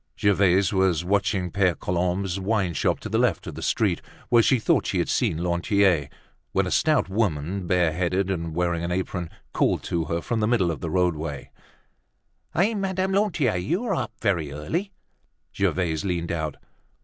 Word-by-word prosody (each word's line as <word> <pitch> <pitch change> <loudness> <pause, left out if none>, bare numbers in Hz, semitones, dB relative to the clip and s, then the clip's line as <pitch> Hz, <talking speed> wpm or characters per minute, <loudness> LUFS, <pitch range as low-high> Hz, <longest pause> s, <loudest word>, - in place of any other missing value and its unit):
Gervaise 100 -2 +3
was 95 -4 +2
watching 95 -2 0
Pere 90 -2 +2
Colombe's 90 +2 -1
wineshop 95 -3 0
to - - -5
the - - 0
left - - +1
of - - -6
the - - -8
street, - - +1 0.3
where 120 -1 +6
she 130 - +3
thought 110 - +1
she - - -1
had - - 0
seen 80 +2 0
Lantier, 90 -3 +2 0.4
when - - +2
a - - -3
stout 155 -4 +2
woman, 95 -3 -1
bareheaded 90 +2 +1
and 85 -3 -3
wearing 85 -1 0
an 85 - -2
apron 90 -1 -2 0.2
called - - +1
to 85 -2 -1
her 85 +1 -1
from 115 +6 -2
the 105 - +1
middle 110 -8 +2
of 75 - -6
the 85 - -3
roadway: 80 -5 -1 1.0
"Hey, 200 +7 +3
Madame 190 -2 -1
Lantier, 175 - +1
you're 180 - -1
up 170 - -2
very 85 - 0
early!" 165 - -3 0.6
Gervaise 80 -4 0
leaned 85 -3 -2
out. 80 -3 -2
90 Hz, 165 wpm, -25 LUFS, 85-105 Hz, 1.0 s, where